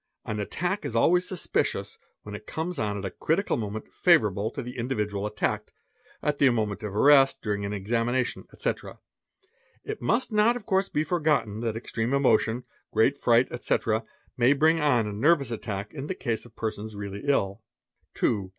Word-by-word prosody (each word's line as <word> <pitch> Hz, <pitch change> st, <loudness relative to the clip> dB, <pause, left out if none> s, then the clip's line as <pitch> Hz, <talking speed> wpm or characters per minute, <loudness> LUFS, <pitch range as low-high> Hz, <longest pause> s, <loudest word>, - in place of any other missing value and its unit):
An 105 Hz, -, -3 dB
attack 175 Hz, -, -2 dB
is 115 Hz, -, -4 dB
always 175 Hz, +10 st, +4 dB
suspicious 185 Hz, -, -2 dB, 0.2 s
when 105 Hz, -, -8 dB
it 105 Hz, -, -8 dB
comes 165 Hz, +3 st, -3 dB
on 105 Hz, -1 st, -1 dB
at 100 Hz, -, -5 dB
a 95 Hz, -, -3 dB
critical 180 Hz, +6 st, 0 dB
t -, -, -2 dB
oment 105 Hz, +1 st, -6 dB
favourable 110 Hz, -, +3 dB
to 125 Hz, -, -6 dB
the 125 Hz, +1 st, -7 dB
individual 105 Hz, -5 st, -2 dB
attacked, 105 Hz, -, -2 dB, 0.5 s
at 150 Hz, -1 st, 0 dB
the 140 Hz, -, +6 dB
moment 110 Hz, -4 st, -1 dB
of 105 Hz, -2 st, -5 dB
arrest, 135 Hz, +2 st, +5 dB
'during 100 Hz, -2 st, -1 dB
an 100 Hz, -, -3 dB
examination, 115 Hz, +5 st, -1 dB
etc. -, -, -4 dB, 0.9 s
It 430 Hz, 0 st, -5 dB
must 235 Hz, +1 st, +1 dB
not 215 Hz, +3 st, +4 dB
of 245 Hz, -, -7 dB
course 190 Hz, -2 st, +1 dB
be 150 Hz, -, 0 dB
forgotten 150 Hz, -, 0 dB
that 115 Hz, -2 st, -2 dB
xtreme 115 Hz, +2 st, -2 dB
emotion, 120 Hz, -3 st, +2 dB, 0.3 s
great 110 Hz, +6 st, +3 dB
fright, 120 Hz, -2 st, +3 dB
etc., 115 Hz, -2 st, 0 dB, 0.3 s
may 125 Hz, +3 st, +4 dB
bring 160 Hz, +3 st, +3 dB
on 125 Hz, -7 st, +3 dB
a 105 Hz, -, -4 dB
nervous 140 Hz, +3 st, +2 dB
attack 105 Hz, -3 st, -4 dB
in 145 Hz, -1 st, -6 dB
the 185 Hz, -, -4 dB
use 115 Hz, 0 st, -1 dB
Of 115 Hz, -, -23 dB
persons 110 Hz, -1 st, -4 dB
really 100 Hz, 0 st, -6 dB
ill. 105 Hz, -7 st, +1 dB, 0.5 s
_ -, -, -63 dB
2. 100 Hz, -5 st, 0 dB
120 Hz, 180 wpm, -27 LUFS, 105-150 Hz, 0.9 s, the